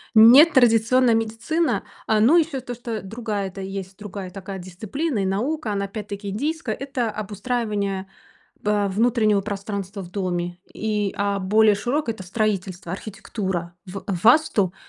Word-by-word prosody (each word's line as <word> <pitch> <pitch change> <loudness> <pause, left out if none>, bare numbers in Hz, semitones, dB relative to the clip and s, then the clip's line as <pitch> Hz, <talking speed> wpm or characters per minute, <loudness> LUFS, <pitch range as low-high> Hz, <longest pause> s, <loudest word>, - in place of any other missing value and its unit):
Нетрадиционная 245 -1 +7
медицина, 225 +9 0 0.2
э, 220 -1 +3
ну, 270 +11 +6
еще 305 -5 +1
то, 245 -1 -6
что-то 230 -2 -5
другая-то 200 -2 -4
есть 190 0 -6
другая 200 -2 -7
такая 195 +1 -7
дисциплина 220 - -3
и 195 - 0
наука, 230 +6 -1
она, 200 -1 -1
опять-таки, 200 0 -6
индийская, 285 - -2
это 265 -4 -2
обустраивание, 205 -2 -2 0.6
э, 210 -1 +2
внутреннего 215 0 +2
пространства 200 -1 -5
в 175 - -10
доме. 175 -2 -2 0.2
И 210 -2 -1
а 200 0 0
более 210 +2 +4
широкое- 245 +3 -1
это 190 -4 -9
строительство, 190 -3 -2
архитектура. 190 -3 -4
В 195 +2 -7 0.2
Васту, 225 - +4
210 Hz, 135 wpm, -23 LUFS, 195-235 Hz, 0.6 s, Нетрадиционная